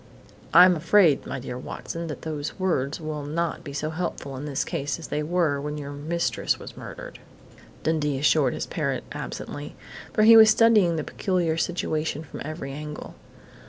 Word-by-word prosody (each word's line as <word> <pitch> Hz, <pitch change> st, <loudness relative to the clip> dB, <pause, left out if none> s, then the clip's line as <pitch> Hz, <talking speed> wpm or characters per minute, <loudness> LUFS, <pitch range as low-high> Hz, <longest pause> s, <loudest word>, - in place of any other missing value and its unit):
"I'm 180 Hz, +1 st, +8 dB
afraid, 165 Hz, -1 st, +4 dB
'my -, -, -4 dB
dear 125 Hz, 0 st, -6 dB
Watson,' 165 Hz, +5 st, -6 dB
that 150 Hz, -, -7 dB
those 155 Hz, -2 st, -4 dB
words 155 Hz, -7 st, 0 dB
will 155 Hz, -2 st, -4 dB
not 160 Hz, +3 st, -2 dB
be 140 Hz, -, -7 dB
so 150 Hz, +2 st, -3 dB
helpful 160 Hz, -5 st, -4 dB
in 135 Hz, +3 st, -6 dB
this 140 Hz, -3 st, -1 dB
case 145 Hz, -5 st, -3 dB
as 165 Hz, -, -9 dB
they 150 Hz, -, -1 dB
were 155 Hz, -3 st, 0 dB
when 150 Hz, +1 st, -4 dB
your 145 Hz, -1 st, -6 dB
mistress 155 Hz, +4 st, -1 dB
was -, -, -10 dB
murdered," -, -, -9 dB, 0.6 s
Dundee 150 Hz, -3 st, 0 dB
assured 145 Hz, -2 st, +3 dB
his -, -, -3 dB
parrot -, -, -2 dB
absently, 145 Hz, 0 st, -6 dB, 0.4 s
for 215 Hz, -, +2 dB
he 225 Hz, +1 st, +9 dB
was 220 Hz, -1 st, +9 dB
studying 215 Hz, -6 st, +5 dB
the 155 Hz, -, -2 dB
peculiar 175 Hz, -3 st, -1 dB
situation 155 Hz, -3 st, -2 dB
from 155 Hz, -, -9 dB
every 155 Hz, -2 st, -6 dB
angle. 150 Hz, +1 st, -7 dB
155 Hz, 170 wpm, -25 LUFS, 145-170 Hz, 0.6 s, he